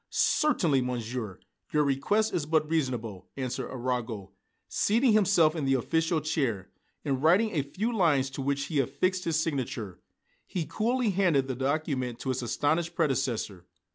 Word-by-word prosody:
"Certainly, 170 Hz, -, +2 dB
Monsieur, 120 Hz, -4 st, -4 dB, 0.3 s
your 150 Hz, -1 st, +3 dB
request 195 Hz, +11 st, +1 dB
is 160 Hz, -5 st, -1 dB
but 155 Hz, -1 st, +2 dB
reasonable," 125 Hz, -, -2 dB
answered 130 Hz, -1 st, -3 dB
Arago, 120 Hz, -6 st, -3 dB, 0.4 s
seating 230 Hz, +4 st, +2 dB
himself 185 Hz, -6 st, +4 dB
in 155 Hz, -, -2 dB
the 135 Hz, 0 st, +3 dB
official 160 Hz, +5 st, 0 dB
chair. 135 Hz, -, -1 dB, 0.3 s
And 135 Hz, -2 st, 0 dB
writing 185 Hz, +8 st, +4 dB
a 155 Hz, -7 st, +1 dB
few 210 Hz, -, -3 dB
lines 145 Hz, -9 st, +2 dB
to 135 Hz, -, -5 dB
which 140 Hz, +1 st, 0 dB
he 155 Hz, -4 st, -1 dB
affixed 180 Hz, +8 st, 0 dB
his 160 Hz, -2 st, +1 dB
signature, 125 Hz, -, -3 dB, 0.5 s
he 175 Hz, -4 st, -3 dB
coolly 235 Hz, +3 st, 0 dB
handed 175 Hz, -8 st, +2 dB
the 130 Hz, -, -2 dB
document 135 Hz, -2 st, -1 dB
to 135 Hz, -, -3 dB
his 130 Hz, 0 st, -1 dB
astonished 160 Hz, +7 st, 0 dB
predecessor. 125 Hz, -, -1 dB
140 Hz, 150 wpm, -28 LUFS, 130-170 Hz, 0.5 s, himself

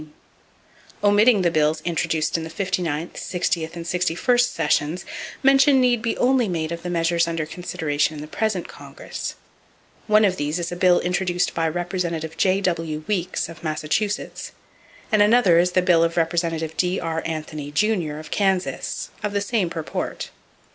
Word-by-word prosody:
Omitting 205 Hz, 0 st, +5 dB
the 170 Hz, -, +3 dB
bills 155 Hz, 0 st, +2 dB
introduced 160 Hz, -2 st, 0 dB
in 165 Hz, -, -1 dB
the 160 Hz, -, -6 dB
59th, 175 Hz, -3 st, -2 dB
60th 170 Hz, -2 st, -2 dB
and 170 Hz, -1 st, -6 dB
61st 185 Hz, +8 st, +1 dB
sessions, 150 Hz, +4 st, 0 dB, 0.4 s
mention 270 Hz, 0 st, +5 dB
need 245 Hz, -3 st, +3 dB
be 230 Hz, 0 st, -1 dB
made -, -, -11 dB
only 235 Hz, -11 st, +2 dB
of 170 Hz, -, -6 dB
the 175 Hz, -, -5 dB
measures 170 Hz, 0 st, +1 dB
under 165 Hz, -2 st, -2 dB
consideration 155 Hz, -3 st, -2 dB
in 145 Hz, -, -7 dB
the -, -, -6 dB
present 205 Hz, +1 st, -2 dB
Congress. -, -, -7 dB, 0.7 s
One 215 Hz, 0 st, +5 dB
of 185 Hz, -2 st, +1 dB
these 145 Hz, +3 st, -1 dB
is 175 Hz, -1 st, -3 dB
a -, -, -3 dB
bill 180 Hz, 0 st, +4 dB
introduced 180 Hz, 0 st, 0 dB
by 165 Hz, -1 st, 0 dB
Representative 170 Hz, -2 st, -3 dB
J.W. 170 Hz, -5 st, 0 dB
Weeks, 185 Hz, -3 st, -1 dB
of 165 Hz, 0 st, -12 dB
Massachusetts, 160 Hz, +7 st, -2 dB, 0.6 s
and 215 Hz, -1 st, +4 dB
another 205 Hz, -5 st, +5 dB
is 180 Hz, +1 st, +2 dB
the 185 Hz, -, +3 dB
bill 175 Hz, -3 st, +4 dB
of 165 Hz, 0 st, -1 dB
Representative 165 Hz, -1 st, 0 dB
D.R. 165 Hz, -3 st, -1 dB
Anthony, 155 Hz, -2 st, -5 dB
Jr., 175 Hz, -1 st, 0 dB
of 155 Hz, +1 st, -9 dB
Kansas, 190 Hz, -2 st, -1 dB
of 210 Hz, -1 st, -2 dB
the 200 Hz, -, +1 dB
same 200 Hz, -3 st, 0 dB
purport. 160 Hz, -2 st, -4 dB
175 Hz, 155 wpm, -23 LUFS, 160-200 Hz, 0.7 s, Omitting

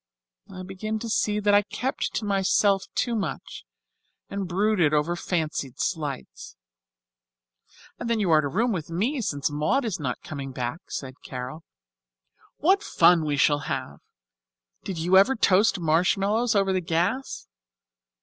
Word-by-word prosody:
I 185 Hz, -, -8 dB
begin 195 Hz, +4 st, -4 dB
to 230 Hz, +1 st, -6 dB
see 210 Hz, -1 st, +1 dB
that 205 Hz, 0 st, +2 dB
I 205 Hz, -, +6 dB
kept 250 Hz, +6 st, -3 dB
to 215 Hz, -, -2 dB
myself 195 Hz, 0 st, +2 dB
too 240 Hz, -, 0 dB
much 205 Hz, -, -5 dB, 0.7 s
and 200 Hz, -1 st, -3 dB
brooded 180 Hz, -4 st, +2 dB
over 155 Hz, +4 st, +1 dB
fancied 155 Hz, -7 st, -3 dB
slights." 145 Hz, -, -4 dB, 1.4 s
"And 235 Hz, -, -4 dB
then 230 Hz, -1 st, +1 dB
you 190 Hz, -5 st, +1 dB
are 155 Hz, -1 st, +6 dB
to 145 Hz, -, -2 dB
room 225 Hz, -, 0 dB
with 165 Hz, -7 st, -4 dB
me 230 Hz, -, -1 dB
since 145 Hz, -, -2 dB
Maud 155 Hz, -, 0 dB
is 215 Hz, -7 st, -2 dB
not 135 Hz, -4 st, -4 dB
coming 140 Hz, -3 st, -6 dB
back," 125 Hz, +4 st, -3 dB
said 130 Hz, -1 st, -7 dB
Carol. 130 Hz, +5 st, -7 dB, 0.9 s
"What 380 Hz, +6 st, +3 dB
fun 170 Hz, -, +4 dB
we 145 Hz, -1 st, -1 dB
shall 145 Hz, +1 st, +3 dB
have. -, -, -4 dB, 0.8 s
Did 190 Hz, -, -5 dB
you 175 Hz, +4 st, +3 dB
ever 240 Hz, +8 st, +5 dB
toast 200 Hz, -1 st, +3 dB
marshmallows 195 Hz, +8 st, +2 dB
over 195 Hz, -1 st, +2 dB
the 185 Hz, -, 0 dB
gas? 175 Hz, +11 st, -2 dB
185 Hz, 150 wpm, -25 LUFS, 155-215 Hz, 1.4 s, I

